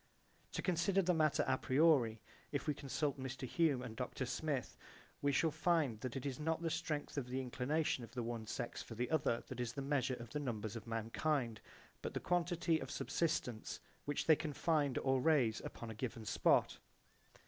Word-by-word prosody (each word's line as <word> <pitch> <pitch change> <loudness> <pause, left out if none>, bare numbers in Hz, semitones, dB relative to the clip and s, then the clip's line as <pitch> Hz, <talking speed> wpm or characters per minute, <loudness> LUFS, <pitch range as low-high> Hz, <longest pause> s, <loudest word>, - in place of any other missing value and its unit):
To - - -2
consider 185 +2 +2
the 180 +1 +3
matter 155 -3 +3
a 130 0 +2
priori 130 -6 +4
[?], - - -27
if - - -1
we 150 - +1
consult 140 0 -2
Mr. 130 0 -4
Hume 145 -4 +2
and 115 -3 -6
Dr. - - -3
Smith, - - -2 0.5
we 145 - +3
shall 160 +4 +3
find 155 -7 +2
that 125 +1 -4
it 135 - -4
is 135 -1 -2
not 160 +2 0
the 165 - 0
strength 155 -3 -2
of 125 - -5
the 130 +1 -1
inclination 130 +2 0
of 115 - -8
the 120 - -1
one 115 -1 -4
sex 120 - -3
for 115 - -8
the 120 +2 -2
other 140 -7 +2
that 130 - -6
is 120 -1 -2
the 140 - -3
measure 135 -2 +1
of 120 -1 -9
the 150 - -1
numbers 110 -6 -3
of 115 - -7
mankind, 115 +1 -1 0.4
but - - -4
the - - +1
quantity 175 -2 +1
of - - -6
subsistence 125 -9 -1 0.3
which 145 -1 -1
they 160 - +7
can 155 -1 -4
find 145 -4 +2
or 130 -1 +2
raise 130 -8 +4
upon 115 -1 -6
a - - -5
given 115 0 -4
spot. - - +3
135 Hz, 200 wpm, -38 LUFS, 120-160 Hz, 0.5 s, they